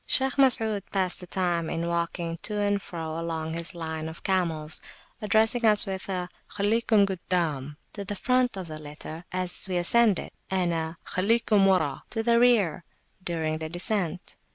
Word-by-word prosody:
Shaykh 265 0 +3
Masud 225 -6 +5
passed 185 -2 0
the 180 - -10
time 175 -3 -1
in 170 +1 -2
walking 170 0 -2
to 210 +4 -2
and 205 -1 +1
fro 160 -3 -5
along 160 -1 -3
his 170 +3 -3
line 160 -1 -4
of 160 - -11
camels, 165 -5 -1 0.4
addressing 220 +3 +2
us 215 0 +6
with 190 -1 -5
a 180 -2 -2 0.2
Khallikum 210 0 +2
guddam, 165 -7 -2 0.2
to 200 - -5
the 205 +1 -4
front 250 0 +1
(of 185 -2 -5
the 155 -1 -7
litter)! 155 +3 -9
as 185 +1 0
we 185 -1 -1
ascended, 210 +2 +3 0.2
and 180 -2 0
a 160 0 -3
Khallikum 210 +1 +2
wara, 160 -8 +1
to 225 -1 -2
the 235 0 +4
rear! 220 -10 +3 0.4
during 160 -3 -2
the 160 0 -5
descent. 180 0 -3
180 Hz, 165 wpm, -27 LUFS, 165-210 Hz, 0.4 s, us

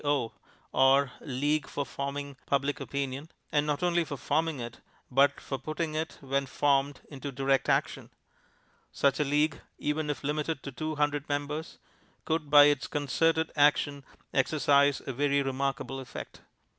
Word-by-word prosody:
O., 145 -5 0 0.4
or 135 0 +4
League 145 +1 -1
for 145 - -3
Forming 140 0 -5
Public 140 +1 0
Opinion, 140 +2 -4 0.2
and 150 -1 +2
not 150 +3 -1
only 175 -1 +3
for 145 -3 -6
forming 155 +2 0
it, 120 -1 -7 0.3
but 140 +2 +4
for 135 - -5
putting 155 +3 -3
it, 160 +1 -3
when 140 0 -1
formed, 140 0 +1
into 140 0 -6
direct 135 +1 +1
action. - - 0 0.8
Such 140 0 +2
a - - +4
League, 145 +1 +1 0.2
even 150 +1 -1
if 145 - -3
limited 150 +1 -2
to 140 - -6
two 155 +5 -4
hundred 145 0 0
members, 145 +3 -3 0.5
could 160 -2 -1
by 145 0 +9
its 145 -2 +3
concerted 160 +3 +1
action 145 -1 +3 0.3
exercise 140 0 +3
a 135 - -3
very 140 +2 +2
remarkable 135 0 -2
effect. 130 -1 -9
145 Hz, 150 wpm, -29 LUFS, 135-150 Hz, 0.8 s, by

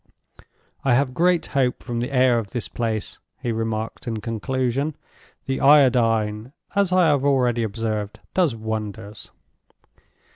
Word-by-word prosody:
"I 135 -3 +3
have 130 0 +1
great 175 +4 +2
hope 130 -3 0
from 120 -2 -3
the 125 +3 -3
air 125 -2 +4
of 105 -3 -6
this 120 +1 -4
place," 110 -3 -3 0.2
he 125 -3 -2
remarked, 115 +1 -3
in 115 -2 -2
conclusion. 130 +5 -2 0.5
"The 135 - -2
Iodine, 120 -5 +3 0.2
as 200 -2 +2
I 180 -1 +4
have 145 -2 +2
already 125 -4 +2
observed, 110 -1 -3
does 170 -10 +2
wonders." 110 -2 -6
120 Hz, 135 wpm, -23 LUFS, 110-135 Hz, 0.5 s, air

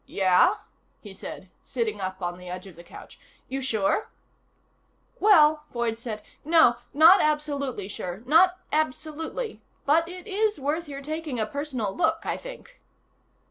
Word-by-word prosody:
"Yeah?" 190 - +4 0.5
he 205 -3 -10
said, 190 -1 -9
sitting 220 -5 -3
up 185 0 -5
on 175 0 -3
the 180 0 -10
edge 180 +1 -6
of 190 -4 -12
the 170 - -13
couch. - - -13 0.3
"You 270 +1 -4
sure?" 230 - 0 1.1
"Well," 310 -7 +5
Boyd 235 -2 -2
said, 215 -3 -6 0.2
"no. 315 -6 +5
Not 330 +6 +7
absolutely 285 -8 -1
sure. 190 0 -6
Not 355 +6 +5 0.2
absolutely. 310 - -3 0.2
But 325 +4 +3
it 365 +1 -9
is 425 -3 0
worth 295 +4 -2
your 280 0 -7
taking 310 -3 -4
a 215 - +1
personal 255 -5 -3
look, 325 -1 +1
I - - -2
think." - - -11
285 Hz, 145 wpm, -26 LUFS, 210-320 Hz, 1.1 s, Not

